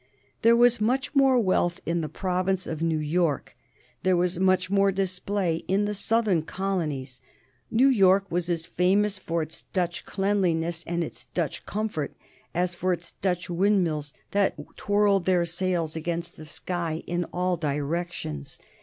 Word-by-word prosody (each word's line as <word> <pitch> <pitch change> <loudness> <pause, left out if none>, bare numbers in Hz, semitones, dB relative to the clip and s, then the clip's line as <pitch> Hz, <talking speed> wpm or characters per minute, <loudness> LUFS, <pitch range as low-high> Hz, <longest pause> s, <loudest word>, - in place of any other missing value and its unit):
There 230 +1 +6
was 240 -1 +4
much 260 +7 0
more 270 -2 +5
wealth 185 -5 +1
in 170 0 0
the 155 - -3
province 185 0 -1
of 160 -1 -5
New 165 -1 +1
York; 155 -2 0 0.5
there 185 -1 +3
was 175 0 0
much 185 -1 +3
more 195 +1 +3
display 190 -2 -1
in 195 +3 +2
the 210 - -1
southern 210 -4 +2
colonies. 155 -9 -3 0.5
New 250 +4 +4
York 195 -6 +5
was 175 0 -1
as 165 -2 0
famous 195 +3 +2
for 165 -3 -1
its 155 +1 -7
Dutch 175 -2 -1
cleanliness 175 -4 0
and 170 0 0
its - - -8
Dutch 170 -5 -2
comfort 205 -9 -3 0.4
as 180 +1 0
for 180 +1 0
its 170 -1 -6
Dutch 180 -2 -2
windmills 175 -5 +1 0.2
that 200 -1 +2 0.2
twirled 205 -2 +2
their 180 -2 +3
sails 170 -2 -1
against 170 +1 -3
the 155 - -11
sky 170 -1 -3
in 175 0 -1
all 180 +1 -1
directions. 150 - -3
180 Hz, 155 wpm, -26 LUFS, 165-195 Hz, 0.5 s, There